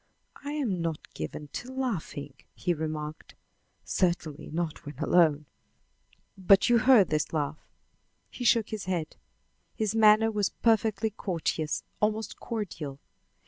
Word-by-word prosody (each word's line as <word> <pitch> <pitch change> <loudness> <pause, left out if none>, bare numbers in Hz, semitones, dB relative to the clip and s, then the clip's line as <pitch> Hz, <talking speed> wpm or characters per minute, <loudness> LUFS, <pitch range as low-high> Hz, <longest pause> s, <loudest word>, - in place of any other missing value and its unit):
"I 290 +1 -4
am 230 - -1
not 165 -2 -4
given 145 - -6
to 245 - -6
laughing," 190 - -3 0.2
he 175 - 0
remarked; 155 -1 -5 0.5
"certainly 170 -5 -1
not 165 0 -3
when 145 -2 -9
alone." 150 0 +3 0.9
"But 195 +2 +5
you 235 - +6
heard 225 -6 +6
this 155 -1 0
laugh?" 150 -1 -2 0.7
He 250 - -6
shook 230 -2 +3
his 215 -4 -5
head. 175 -4 -2 0.6
His 215 -2 -1
manner 220 0 +5
was 205 -2 +1
perfectly 220 -1 +2
courteous, 165 -6 -2 0.2
almost 215 +1 -1
cordial. 165 - -5
185 Hz, 125 wpm, -28 LUFS, 155-220 Hz, 0.9 s, you